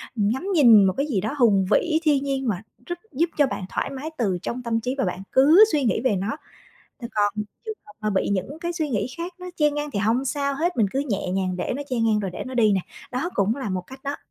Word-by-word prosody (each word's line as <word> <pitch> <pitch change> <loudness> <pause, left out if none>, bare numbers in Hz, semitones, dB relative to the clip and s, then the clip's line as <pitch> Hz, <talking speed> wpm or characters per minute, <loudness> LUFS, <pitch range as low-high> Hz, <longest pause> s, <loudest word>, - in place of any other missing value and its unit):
ngắm 230 - 0
nhìn 230 - +7
một 190 - +2
cái 280 - +1
gì 205 -10 0
đó 220 +7 -2
hùng 205 -6 +4
vĩ, 320 -2 +3
thiên 290 -3 +3
nhiên 270 -2 -2
mà 195 -3 -1 0.2
rất 350 0 -5
giúp 330 +5 +1
cho 290 -2 +4
bạn 190 - -4
thoải - - -2
mái 275 +3 -5
từ 195 -7 0
trong 250 +1 -4
tâm 230 -1 0
trí 250 +3 -2
và 265 - +1
bạn 180 +1 -3
cứ 305 +10 +7
suy 295 -3 +1
nghĩ 225 - +1
về 250 -5 +2
nó. 200 +9 -2 0.8
Còn 205 -1 +2 0.3
trường 440 -1 -4
hợp 210 - -13
mà 215 -1 -1
bị 195 - 0
những 200 - -2
cái 345 0 -2
suy 315 -3 -2
nghĩ 230 -4 -1
khác 345 +2 -5
nó 360 - -7
chen 295 -1 +2
ngang 295 0 -3
thì 205 - -3
hông 230 +6 +1
sao 280 +1 -1
hết, 345 +5 -1
mình 220 -4 +3
cứ 270 +5 0
nhẹ 200 -3 -1
nhàng 185 -1 -1
để 180 - -2
nó 285 - -4
chen 235 -3 +1
ngang 215 -2 +3
rồi 195 -2 -3
để - - -6
nó 260 - -6
đi 215 -4 +4
nè, 190 - +2 0.3
đó 320 +8 -2
cũng 205 +5 +1
là 260 -8 -4
một 185 -1 -2
cách 265 0 -12
đó. 280 +1 -2
250 Hz, 270 wpm, -24 LUFS, 205-290 Hz, 0.8 s, nhìn